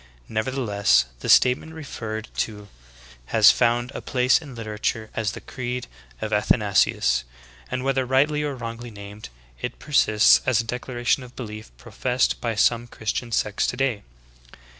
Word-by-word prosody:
Nevertheless, 110 - +1
the - - -5
statement 130 +5 +4
referred 110 -8 -6
to 105 -2 -3 0.6
has 110 -2 +7
found 120 +1 +1
a - - -6
place 125 +2 +2
in 140 -5 -10
literature 110 0 -3
as 110 -2 -1
the - - -8
"Creed 125 -1 -5 0.4
of - - -3
Athanasius," - - +2 0.5
and 125 - -3
whether 135 -1 +1
rightly 140 +4 +2
or 145 -2 -2
wrongly 120 0 -7
named 100 - -10 0.3
it - - -4
persists 110 -7 +4
as 125 -3 +2
a - - +1
declaration 120 +2 -1
of 125 -1 -12
belief 110 -3 -8
professed 125 - -1
by 115 -2 -1
some 120 +2 +2
Christian 115 +1 -4
sects 105 -1 0
today. 125 -5 -1
120 Hz, 140 wpm, -24 LUFS, 110-130 Hz, 0.6 s, has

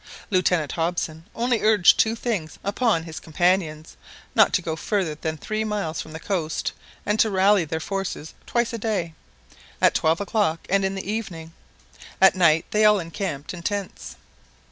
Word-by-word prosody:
Lieutenant 180 -5 +2
Hobson 165 -1 -2
only 240 0 +1
urged 215 -4 +5
two 220 +1 +3
things 210 -10 -3
upon 205 -4 +1
his 160 -1 -7
companions 165 -2 0 0.4
not - - +5
to 185 - +2
go 160 -1 -2
further 185 -2 -1
than 155 +1 -4
three 215 +7 -3
miles 205 -7 -2
from 155 - -10
the 160 - -7
coast, 165 -4 -2 0.3
and 210 +1 0
to 220 - +4
rally 195 -1 +3
their 160 +1 -3
forces 195 -3 -4
twice 235 0 0
a 230 - -3
day, 200 -7 -2 0.7
at - - +4
twelve 160 +2 +2
o'clock 200 -6 0
and 195 0 +3
in 190 0 -1
the 195 - -6
evening. 180 -7 -5 0.7
At 190 - +7
night 165 -3 +3
they 215 0 +2
all 210 -1 +6
encamped 165 -4 -5
in 175 - -8
tents. 200 - -4
185 Hz, 165 wpm, -24 LUFS, 160-210 Hz, 0.7 s, At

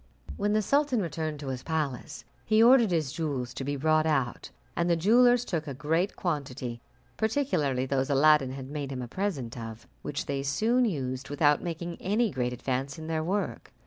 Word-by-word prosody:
When 205 +1 0
the 215 0 +2
sultan 280 0 +2
returned 155 -4 -3
to 140 - -5
his 130 -1 -4
palace, 155 -1 -3 0.2
he 220 +1 +4
ordered 240 -2 +6
his 160 -6 0
jewels 135 -7 -3
to 135 - -5
be 145 +2 -2
brought 155 +2 +2
out, 135 -6 -1 0.3
and 170 0 +1
the 170 - +4
jewellers 245 +7 +4
took 165 -7 -3
a 140 - -4
great 160 +7 0
quantity, 130 -8 -3 0.4
particularly 185 - 0
those 135 0 0
Aladdin 140 -1 +4
had 135 0 -7
made 145 -2 -4
him 125 -2 -4
a - - -6
present 145 - -3
of, 115 -1 -8 0.2
which 145 -1 -4
they 140 -1 -2
soon 225 - +2
used, 135 - -3
without 145 0 +3
making 170 0 -5
any 215 +3 +1
great 125 -1 -1
advance 130 +3 -3
in 160 - -7
their 160 -1 -1
work. 195 +5 -2
155 Hz, 185 wpm, -28 LUFS, 135-190 Hz, 0.4 s, ordered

